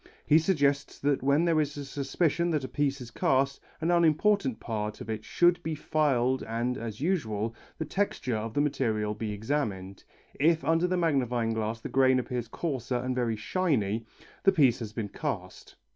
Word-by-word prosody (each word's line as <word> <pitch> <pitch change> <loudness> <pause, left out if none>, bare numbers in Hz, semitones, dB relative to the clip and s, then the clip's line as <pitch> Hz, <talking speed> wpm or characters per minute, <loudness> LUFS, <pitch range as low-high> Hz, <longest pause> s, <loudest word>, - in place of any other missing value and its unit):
He 155 +1 +6
suggests 145 -5 +1
that 140 -1 0
when 140 +5 +3
there 165 -2 +3
is 150 0 -3
a 145 - -5
suspicion 155 +5 0
that 155 -4 0
a - - -3
piece 140 -1 -1
is 120 -1 -9
cast, 135 +3 +1 0.2
an 165 +2 +1
unimportant 170 - +3
part 105 -2 -4
of 110 - -5
it 110 -1 -4
should 175 +7 +3
be 160 -1 -3
filed 135 -4 +1
and, 120 +2 -2
as 115 -1 -6
usual, 115 - -1 0.2
the 160 - -3
texture 155 - -1
of 110 +1 -4
the 145 - +3
material 115 -8 0
be 105 0 -4
examined. 105 -4 -3 0.3
If 160 +3 +2
under 165 +2 +3
the 185 0 0
magnifying 125 -9 +1
glass 110 +1 -2
the - - -6
grain 130 -1 +4
appears 125 -2 -3
coarser 130 -2 -3
and 130 +1 -1
very 120 -3 0
shiny, 115 - 0 0.3
the 195 - +5
piece 140 -10 +4
has 110 -3 -5
been 110 -2 -4
cast. - - -5
135 Hz, 180 wpm, -28 LUFS, 115-155 Hz, 0.3 s, He